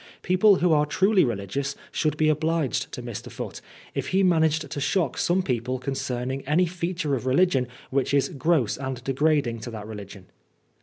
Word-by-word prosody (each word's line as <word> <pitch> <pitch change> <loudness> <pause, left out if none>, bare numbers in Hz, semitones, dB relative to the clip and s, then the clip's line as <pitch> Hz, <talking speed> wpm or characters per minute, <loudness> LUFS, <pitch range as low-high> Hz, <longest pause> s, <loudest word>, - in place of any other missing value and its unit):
People 185 +3 +5
who 180 -2 +2
are 150 -1 +3
truly 190 +5 +3
religious 120 +5 -2 0.2
should 150 -2 0
be 155 - +3
obliged 155 -3 0
to - - -6
Mr. - - -7
Foote, - - -6 0.3
if - - -3
he 190 +1 +2
managed 160 -3 +2
to 145 - -4
shock 165 -2 +1
some 185 +2 +1
people 125 -2 -1
concerning 130 0 -3
any 165 +5 +3
feature 170 -3 -2
of 130 -1 -2
religion 135 -2 +3 0.2
which 135 0 +1
is 140 -1 +2
gross 150 - +1
and 130 -2 -5
degrading 135 -3 +1
to 120 +2 -7
that 110 -3 -7
religion. 100 -3 -9
145 Hz, 170 wpm, -25 LUFS, 125-170 Hz, 0.3 s, People